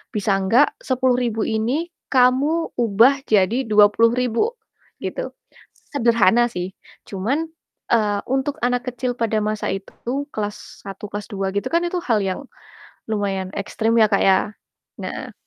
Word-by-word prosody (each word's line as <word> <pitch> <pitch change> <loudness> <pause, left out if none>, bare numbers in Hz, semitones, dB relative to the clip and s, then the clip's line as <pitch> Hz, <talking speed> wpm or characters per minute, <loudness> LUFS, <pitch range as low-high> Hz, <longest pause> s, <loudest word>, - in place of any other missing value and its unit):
"Bisa 200 -1 +1
enggak 230 +10 +4
Rp10.000 250 -4 0
ini 255 +11 -1 0.2
kamu 275 +6 +2
ubah 240 +5 +4
jadi 220 +5 +2
Rp20.000," 230 - +3 0.5
gitu. - - -4 0.6
Sederhana 235 -3 +3
sih, 180 -4 -5 0.4
cuman, 270 +12 -2 0.4
eee, 210 -3 +2
untuk 270 +2 0
anak 245 +1 0
kecil 250 0 -2
pada 225 -3 0
masa 215 0 -2
itu, 240 +8 -4
kelas 210 -1 -6
1 195 +1 -8
kelas 205 0 -5
2 195 -1 -3
gitu 200 +1 -2
kan, 335 +1 +1
itu 355 +1 -1
hal 220 -5 +2
yang 190 -1 -2 0.7
lumayan 195 -3 -1
ekstrim 225 +3 0
ya, 220 - +7
Kak, 200 -1 +1
ya. 195 +2 +3 0.5
Nah, - - -6
230 Hz, 130 wpm, -21 LUFS, 205-255 Hz, 0.7 s, ya